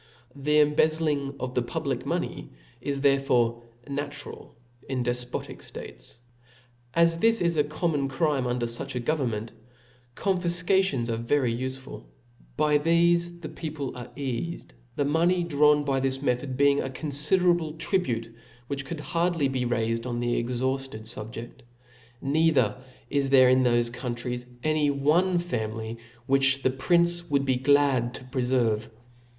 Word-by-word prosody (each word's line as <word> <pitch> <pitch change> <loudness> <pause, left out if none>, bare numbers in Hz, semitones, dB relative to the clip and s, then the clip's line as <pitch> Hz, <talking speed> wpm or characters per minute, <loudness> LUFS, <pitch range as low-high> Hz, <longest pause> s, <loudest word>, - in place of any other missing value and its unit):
The 150 +2 +2
embezzling 150 -2 +1
of 130 0 -4
the 125 - +1
public 120 - -2
pioney - - -3 0.3
is 140 +1 -2
therefore 125 -4 +2 0.3
natural 145 +1 -6 0.3
in 130 -2 -1
defpbtic 120 0 -3
ftates. - - -10 0.8
'As 165 0 +3
this 225 +2 +3
is 170 -1 +1
a 150 - +3
common 150 -1 -1
crime 135 -2 0
under 120 -1 -1
fuch 115 +2 -4
a - - 0
govern 135 +1 0
ment, 110 0 -5 0.6
confifcations 180 - +1
are 115 - -1
very 120 +1 +1
ufeful. 130 +2 -6 0.5
By 150 -1 +3
thefe 170 +2 +2
the 155 - -6
people 155 -3 -5
are 125 -1 -7
eafed 140 +5 -2
•, - - -18 0.2
the 145 - 0
money 170 +4 +2
drawn 150 -2 +4
by 135 -2 0
this 135 0 0
me 135 -2 +2
thod 130 +1 -5
being 140 0 +4
a 135 - -3
confiderable 155 +4 +1
tribute, 120 - -1 0.3
which 140 +1 -4
could 155 +2 -5
hardly 170 -4 0
be'raifed 120 -2 -1
on 120 -1 -2
the 120 -1 0
exhaufted 130 0 -2
fubjeft: 115 +1 -7 0.6
neither 140 -6 +3 0.4
is 140 -1 +1
there 130 -2 +7
in 130 0 +4
thofe 120 -1 +2
countries 125 0 -4 0.2
any 155 -1 +2
one 155 +7 +2
family 115 -8 -3 0.3
which 135 0 +3
the 130 - +3
pririce 170 +5 +2
would 140 -1 +1
be 130 -2 +2
glad 135 -2 +3
to - - -8
prefer 125 -3 +1
vc. 110 - -10
140 Hz, 145 wpm, -26 LUFS, 125-155 Hz, 0.8 s, there